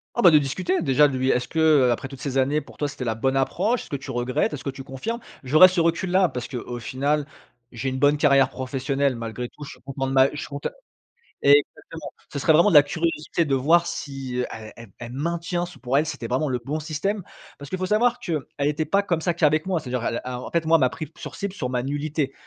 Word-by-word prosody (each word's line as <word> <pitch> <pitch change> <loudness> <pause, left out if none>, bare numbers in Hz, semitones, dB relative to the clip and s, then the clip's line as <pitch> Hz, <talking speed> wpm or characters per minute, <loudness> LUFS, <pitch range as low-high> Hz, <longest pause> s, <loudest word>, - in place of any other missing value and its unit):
Ah 240 - +1
bah, 180 - +8
de 155 - +6
discuter, 175 +7 -1
déjà, 145 0 +4
de 130 -2 -3
lui 130 +1 0
est-ce 125 - +1
que, 160 - -8
heu, 145 -6 +5
après 130 +3 -3
toutes 135 -2 -10
ces 135 -1 -3
années 140 +3 +2
pour - - -14
toi, 145 -1 -1
c'était 130 - -6
la 110 -1 -1
bonne 130 +4 0
approche? 200 - 0
Est-ce - - -15
que 140 - -3
tu 135 0 -6
regrettes? 120 +3 0
Est-ce 140 -4 -6
que - - -1
tu 135 0 -7
confirmes? 220 - -5 0.2
J'aurais 155 +8 +7
ce 180 -1 -1
recul 170 +2 +1
là 185 0 +4
parce 125 -5 -6
qu'au 120 -2 -5
final, 140 +5 -1 0.5
j'ai 120 +2 -5
une 130 - -2
bonne 145 +2 +3
carrière 140 -2 +4
professionnelle 135 0 -1
malgré 115 +1 -5
tout, 150 - -12
je - - -8
suis - - -14
content 135 +1 -4
de - - -3
ma 135 0 +5
je - - -7
suis - - -5
conte 140 0 -4 0.7
exactement, 145 +1 +2 0.2
ce - - -4
serait 160 - +3
vraiment 170 +6 +6
de - - 0
la 145 - +10
curiosité 165 +2 -1
de 135 -2 +1
voir 165 +6 +3
si, 135 -3 -4
elle 110 -1 -9
elle 115 -2 -12
elle 120 0 -7
maintient, 170 +4 -2
se 175 - -13
pour 130 +2 0
elle 150 - +2
c'était 120 -6 -5
vraiment 130 +4 0
le 125 -1 -1
bon 145 +6 -4
système. 180 +6 -2 0.3
Parce 145 0 -10
que 185 - -1
faut 185 - -2
savoir 240 +5 +2
qu'elle 165 - -2 0.2
était 150 +2 0
pas 200 +6 +2
comme 170 -5 -1
ça 175 0 0
qu'avec 155 -1 +2
moi, 185 -3 0
c'est-à-dire 125 -4 -4
elle 115 - -2
a 125 0 -4
en - - -8
fait 170 -1 0
moi 165 - +4
elle - - -2
m'a 130 - +4
pris 150 +4 -7
sur - - -8
cible 200 -1 -4
sur 125 -10 -4
ma 125 -1 -1
nullité. 145 0 -2
145 Hz, 260 wpm, -24 LUFS, 130-165 Hz, 0.7 s, la